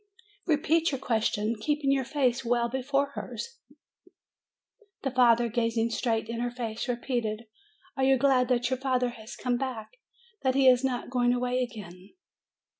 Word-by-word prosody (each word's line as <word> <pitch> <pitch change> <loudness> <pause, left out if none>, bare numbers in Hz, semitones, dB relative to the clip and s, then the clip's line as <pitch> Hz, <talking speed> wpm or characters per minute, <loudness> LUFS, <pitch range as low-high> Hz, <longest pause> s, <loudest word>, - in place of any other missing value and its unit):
Repeat 320 +1 +2
your 270 - -2
question, 220 -2 0
keeping 290 +3 0
your 270 -1 +2
face 265 -2 0
well 240 0 +1
before 275 +3 -1
hers." 470 +9 -7 1.4
The 270 - -1
father, 240 -2 +4
gazing 230 0 0
straight 225 -1 -1
in 230 0 -4
her 245 0 -1
face, 235 -2 -5
repeated, 235 -3 -2 0.5
"Are 270 - -1
you 265 0 +5
glad 255 -1 +3
that 245 0 +1
your 260 - 0
father 255 -2 +1
has 220 -2 -10
come 245 -1 -1
back? 260 - -5 0.4
that 260 -1 +1
he 270 -1 +4
is 250 0 +6
not 250 -2 -2
going 245 -1 +2
away 250 +1 0
again?" 200 - -8
245 Hz, 155 wpm, -28 LUFS, 235-265 Hz, 1.4 s, is